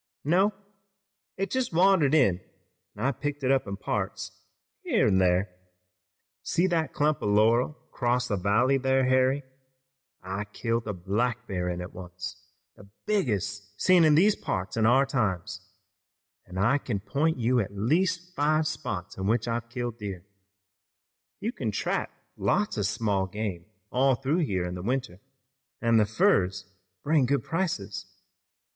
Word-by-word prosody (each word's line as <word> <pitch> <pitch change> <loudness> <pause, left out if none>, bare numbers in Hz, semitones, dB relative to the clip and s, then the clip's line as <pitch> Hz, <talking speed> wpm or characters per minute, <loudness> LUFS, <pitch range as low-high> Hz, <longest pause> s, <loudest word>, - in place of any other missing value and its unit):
"No, 185 +7 +3 0.9
it 195 +1 -2
just 260 -2 0
wandered 170 -4 +4
in 100 - +4 0.6
an' - - -3
I've 135 -3 -1
picked 145 -1 -3
it 130 - +3
up 135 -3 +2
in 100 0 -4
parts, 95 -2 -3 0.5
here - - +2
an' 95 -3 +3
thar. 90 +2 +3 0.9
See 175 - +1
that 165 -4 0
clump 150 +1 +1
o' - - -1
laurel 115 +7 +3 0.2
'cross 125 0 0
the 105 - 0
valley 110 +8 +2
thar, 130 0 +2
Harry? 130 +2 +2 0.8
I 95 +3 -4
killed 115 +2 -2
a 105 - -2
black 115 +7 -1
bear 90 -2 -2
in 90 0 -3
it 90 - -8
once, 90 0 -8 0.3
the 100 - -16 0.2
biggest 105 - -2
seen 180 -2 +5
in 155 -2 +5
these 200 +6 +5
parts 95 +1 -3
in 110 -1 +3
our 130 +4 +5
times, 105 -10 -2 0.8
an' 90 - -9
I 120 +9 +3
kin 115 -7 -3
point 155 +8 0
you 125 +1 +2
at 100 -3 -2
least 170 - 0
five 155 0 +2
spots 100 - -4
in 95 0 -2
which 115 +2 +1
I've 115 0 -2
killed 120 -1 -4
deer. 100 -4 -6 1.1
You 225 - -2
kin 125 - -3
trap 105 - -1 0.3
lots 210 +1 0
of 105 -2 0
small 100 -3 0
game 95 -3 -4 0.3
all 130 +1 +3
through 135 +7 0
here 95 - 0
in 90 - -4
the 90 - -6
winter, 120 -4 -2 0.6
an' 115 -1 +3
the 105 -2 +4
furs 95 -3 +2 0.4
bring 145 -4 +3
good 140 -2 +1
prices. 160 - -3
115 Hz, 155 wpm, -27 LUFS, 100-145 Hz, 1.1 s, seen